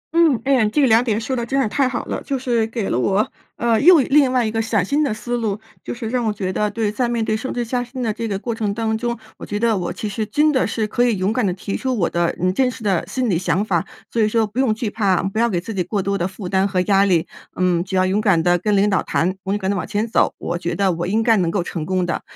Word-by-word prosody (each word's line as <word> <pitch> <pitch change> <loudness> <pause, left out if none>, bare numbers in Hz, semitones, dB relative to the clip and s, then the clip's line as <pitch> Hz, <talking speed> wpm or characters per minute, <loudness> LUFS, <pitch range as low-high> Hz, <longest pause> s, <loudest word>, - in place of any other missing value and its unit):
嗯， 325 -8 +4
诶， 260 -6 +3
这 260 - 0
个 275 - +5
2 225 +1 +5
点 220 -3 0
说 245 +4 -3
得 240 - -2
真 270 +4 -1
是 265 - +2
太 260 +5 +1
好 240 - -3
了， - - -4
就 275 -2 -2
是 240 -3 0
给 225 -2 -3
了 125 - 0
我， 195 +9 +1 0.3
呃， 230 -1 +1
又 350 +4 +8
另 275 0 +4
外 250 -2 +2
一 215 - -1
个 225 0 0
崭 215 -4 0
新 290 +9 +1
的 280 - 0
思 240 +3 -3
路。 215 -3 -2 0.2
就 - - -5
是 235 -1 -5
让 245 +2 -1
我 220 - +1
觉 190 -3 -3
得 210 +2 0
对， 210 0 -1
在 240 +3 -1
面 235 -2 -1
对 215 - 0
升 255 +5 -4
职 240 -1 -2
加 245 +1 -1
薪 250 +1 -6
的 220 -2 0
这 230 +1 -4
个 200 -3 -2
过 230 +3 -4
程 220 -2 -2
当 220 -1 -1
中， 235 +1 -2 0.2
我 - - -8
觉 205 - -3
得 230 -1 +2
我 175 -3 -2
其 215 - -5
实 210 +2 -3
真 300 +5 +3
的 260 - +1
是 220 - -1
可 240 +3 0
以 235 -4 +2
勇 190 +3 0
敢 250 - 0
地 - - +1
提 195 +2 -5
出 260 -2 -2
我 175 - +2
的， 170 0 0
嗯， 185 +1 +1
真 255 +5 +2
实 235 - -9
的 195 -5 +1
心 250 +6 -1
理 180 -6 +1
想 185 +3 0
法。 175 -6 0 0.2
所 230 - 0
以 215 - +4
说 225 0 +2
不 210 +4 -5
用 260 -4 +3
惧 225 0 -3
怕， 200 -5 +1
不 195 +3 -2
要 235 0 +3
给 180 - 0
自 200 +6 -6
己 190 - -1
过 200 +4 -2
多 200 +1 -1
的 175 -2 0
负 190 0 -8
担 190 +1 +2
和 190 -2 -1
压 195 +1 +3
力。 175 -5 +2 0.3
嗯， 180 -2 +1
只 190 +1 -5
要 185 0 +3
勇 195 +3 +1
敢 190 -7 +3
地 175 0 +3
跟 205 +2 +1
领 200 +1 +3
导 190 - +2
谈， 185 +3 0
勇 200 +1 +1
敢 190 -1 -1
地 - - -1
往 180 - -3
前 210 +2 -1
走， 225 - +1
我 170 0 -3
觉 175 0 -3
得 195 +1 +2
我 175 0 -3
应 220 +4 +1
该 225 -1 +4
能 175 -3 +1
够 180 0 -1
成 170 -2 -4
功 185 -1 0
的。 170 - -2
215 Hz, 330 characters per minute, -20 LUFS, 190-235 Hz, 0.3 s, 又